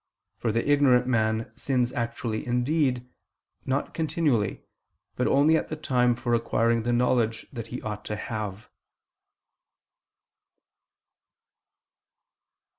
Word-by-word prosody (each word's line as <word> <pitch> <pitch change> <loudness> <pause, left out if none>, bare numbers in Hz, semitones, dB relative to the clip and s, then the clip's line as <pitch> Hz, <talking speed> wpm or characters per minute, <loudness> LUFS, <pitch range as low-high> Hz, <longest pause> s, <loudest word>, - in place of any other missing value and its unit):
For 115 - 0
the 115 +4 -1
ignorant 140 -4 +4
man 110 -2 0
sins 125 -3 0
actually 115 -2 -3
indeed, 125 0 +1 0.6
not 135 +2 -1
continually, 145 - 0 0.5
but 125 - 0
only 145 +4 +4
at - - 0
the 155 - -4
time 125 -5 +2
for 120 0 -2
acquiring 115 0 +2
the 120 +2 -1
knowledge 120 -2 +1
that 115 -3 -6
he 125 - -7
ought 105 -1 -5
to 105 - -3
have. 105 -1 -5
120 Hz, 110 wpm, -26 LUFS, 115-130 Hz, 0.6 s, ignorant